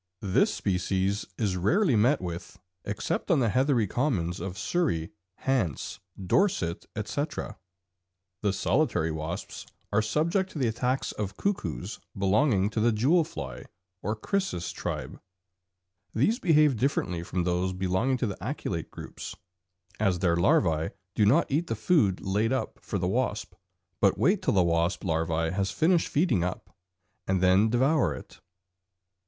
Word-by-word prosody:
This 95 -2 +3
species 95 +2 -1
is 100 -5 0
rarely 140 - +2
met 120 +8 +3
with 85 -1 -6 0.3
except - - -2
on - - +4
the 120 -4 +2
heathery 130 0 +2
commons 95 - -1
of 95 +2 -5
Surrey, 125 - -1 0.3
Hants, 105 - -1 0.2
Dorset, 95 - +1
etc. 105 +1 -3 0.8
The 105 - +2
solitary 80 -4 +1
wasps 80 +5 -5 0.2
are 105 +1 +3
subject 170 - 0
to - - -6
the 130 -4 +1
attacks 125 +4 -1
of 100 -2 -5
cuckoos 150 - -2 0.2
belonging 100 +1 +2
to 110 - -2
the 115 +2 +4
jewel 140 +11 +3
fly - - -7 0.4
or 105 +3 -1
Chrysis 110 - -2
tribe; - - -5 0.9
these 210 - +2
behave 150 -7 +4
differently 105 -8 0
from 90 +1 -2
those 90 +1 0
belonging 95 +8 0
to 125 - -1
the 100 -4 -5
aculeate - - -3
groups, - - -8 0.6
as 100 -4 +2
their 90 -2 +2
larvæ 85 -2 +2 0.2
do 105 - +3
not 150 +10 +5
eat 160 +5 +1
the 115 - -1
food 110 - +2
laid 105 +4 0
up 130 - -2
for 100 - -3
the 90 -1 -1
wasp, 110 -2 -1 0.5
but 100 -2 +3
wait 180 - +3
till 185 - +1
the 95 - +5
wasp 85 +1 +1
larva 80 -2 0
has 95 +1 0
finished 170 +1 +2
feeding 135 - +2
up, 90 +1 -5 0.5
and 95 0 +2
then 95 +4 +4
devour 125 - +2
it. - - -12
105 Hz, 145 wpm, -28 LUFS, 90-135 Hz, 0.9 s, not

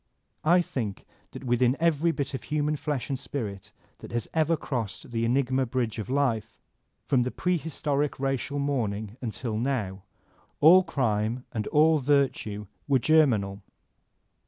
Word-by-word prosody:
I 175 +3 +5
think 110 - -4 0.2
that - - -9
within 125 +1 +2
every 165 0 +2
bit 140 -4 -3
of 135 - -5
human 150 0 0
flesh 145 -3 -3
and 135 -2 -2
spirit 100 -8 -5 0.3
that - - -10
has 120 -1 -2
ever 160 0 +2
crossed 120 -6 -4
the 115 0 0
enigma 130 +1 +1
bridge 120 -2 -2
of 110 - -5
life, 115 -5 0 0.5
from 130 -3 +3
the 125 - 0
prehbtoric 150 -4 -1
racial 135 +1 -1
morn 140 -7 0
ing 105 +2 -7
until 115 -2 -3
now, 110 -7 -2 0.6
all 170 +5 +8
crime 120 - -1
and 110 -2 -3
all 155 +1 +4
virtue 130 -7 +1 0.2
were 140 -2 +4
germinal. 115 -9 +3
130 Hz, 145 wpm, -27 LUFS, 115-145 Hz, 0.6 s, all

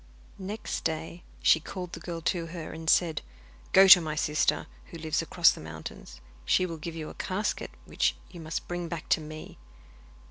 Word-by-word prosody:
Next 205 +3 -4
day 160 +2 -3 0.2
she 160 - +6
called 180 +2 -7
the - - -6
girl 170 -2 -6
to 165 0 -1
her 165 -1 -7
and 160 0 -4
said: 160 -5 +3 0.5
'Go 195 +1 +8
to 185 -2 +11
my 155 -2 -3
sister, 150 0 +1 0.2
who 170 - -10
lives 160 0 -1
across 170 +1 +4
the - - -8
mountains. 80 -6 -9 0.2
She 185 - +3
will 165 -2 -5
give 165 +1 -6
you 155 -2 -5
a - - -9
casket, 205 +3 -2 0.2
which - - +1 0.2
you 175 - -10
must 160 0 -5
bring 175 -1 -3
back 165 -2 -6
to - - +3
me. 155 - -9
165 Hz, 185 wpm, -28 LUFS, 155-175 Hz, 0.5 s, to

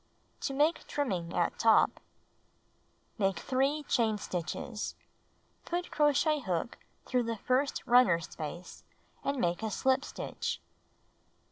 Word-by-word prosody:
To 275 - -2
Make 305 +4 +2
Trimming 185 -13 -2
at 175 - 0
Top 225 -1 +4 1.2
Make 195 -2 +2
3 275 +4 0
chain 225 -6 +1
stitches. 205 +4 -4 0.7
Put 350 +1 -3
crochet 300 +1 +3
hook 185 -3 -2 0.3
through 250 -1 +1
the 230 -1 -2
first 260 +6 0
runner 240 -9 +6
space 170 +2 -7 0.4
and 280 0 -1
make 175 -2 0
a 220 - -1
slip 265 +5 +2
stitch. - - -4
245 Hz, 115 wpm, -31 LUFS, 185-280 Hz, 1.2 s, runner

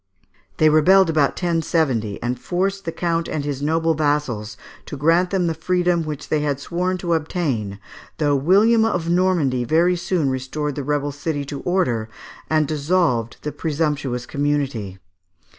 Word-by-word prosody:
They 155 - +4
rebelled 165 +4 +5
about 150 -3 +2
1070, 160 - 0
and 125 0 -2
forced 195 +4 -2
the 165 - -2
count 170 0 -1
and 145 -2 -3
his 140 -2 -3
noble 160 +2 +1
vassals 145 -9 -1 0.3
to 145 - -6
grant 165 +5 +3
them 190 -2 0
the 165 - 0
freedom 175 +1 +1
which 150 -2 -6
they 155 - +1
had 145 -2 -1
sworn 180 +5 -2
to 175 -1 -1
obtain, 145 - -2 0.4
though 145 -2 +2
William 205 - +4
of 175 -7 0
Normandy 170 -9 +2
very 170 +8 +3
soon 170 -5 0
restored 135 +3 -3
the 145 - -4
rebel 145 +1 -1
city 145 0 -3
to 140 0 -6
order, 125 -12 0 0.4
and 155 -2 +2
dissolved 150 -6 0
the 150 - -3
presumptuous 145 -6 -2
community. 140 -9 -2
155 Hz, 155 wpm, -21 LUFS, 140-175 Hz, 0.4 s, rebelled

